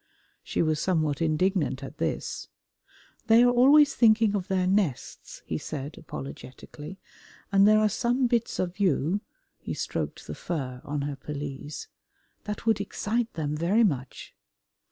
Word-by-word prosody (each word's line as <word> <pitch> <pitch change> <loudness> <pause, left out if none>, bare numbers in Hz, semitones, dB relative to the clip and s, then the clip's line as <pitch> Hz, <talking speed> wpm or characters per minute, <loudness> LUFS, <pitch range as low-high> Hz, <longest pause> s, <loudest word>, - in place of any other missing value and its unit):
She - - -1
was 155 -1 +1
somewhat 155 -4 0
indignant 155 -3 +1
at 145 +3 -9
this. - - -3 0.8
"They 230 +1 +7
are 245 - +5
always 280 +4 +6
thinking 220 -2 +4
of 185 -3 -2
their 185 -1 +1
nests," 185 - -2
he 80 - -3
said 145 0 -6
apologetically, 145 +5 -9 0.5
"and 195 0 +6
there 215 0 +6
are 215 0 +4
some 245 +5 +1
bits 235 -1 0
of 180 +2 -3
you" 185 0 +1 0.4
he - - -5
stroked - - -4
the - - -6
fur 130 -7 -4
on 145 0 -3
her 145 0 -3
pelisse 145 0 -6 0.6
"that 210 +1 -5
would 220 -3 +2
excite 225 +3 -2
them 150 -2 -2
very 180 +9 +2
much." 140 - -2
185 Hz, 145 wpm, -27 LUFS, 150-215 Hz, 0.8 s, They